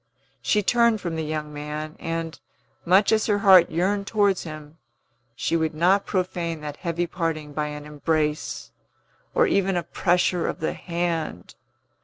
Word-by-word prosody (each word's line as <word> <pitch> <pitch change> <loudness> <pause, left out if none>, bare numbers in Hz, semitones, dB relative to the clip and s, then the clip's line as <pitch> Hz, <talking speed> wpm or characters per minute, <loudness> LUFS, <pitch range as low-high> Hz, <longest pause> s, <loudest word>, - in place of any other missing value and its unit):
She 210 +10 +2
turned 235 +1 +3
from 170 -4 -4
the 160 - -2
young 150 -1 -4
man, 150 +1 -5
and, 165 -1 -4 0.5
much 190 +4 +4
as 215 -1 +2
her 205 -2 +2
heart 190 -4 +7
yearned 195 +4 0
towards 205 -3 +2
him, 155 0 -9 0.6
she 165 - -1
would 160 -1 0
not 185 +5 +3
profane 175 -4 -2
that 150 -1 -6
heavy 170 -1 -2
parting 165 -4 -3
by 150 0 -1
an 150 0 -7
embrace, 150 0 -2 0.6
or - - +5
even 195 -2 +1
a 175 - -1
pressure 175 0 +1
of - - -4
the 160 - -1
hand. 170 - -3
165 Hz, 155 wpm, -24 LUFS, 155-185 Hz, 0.6 s, heart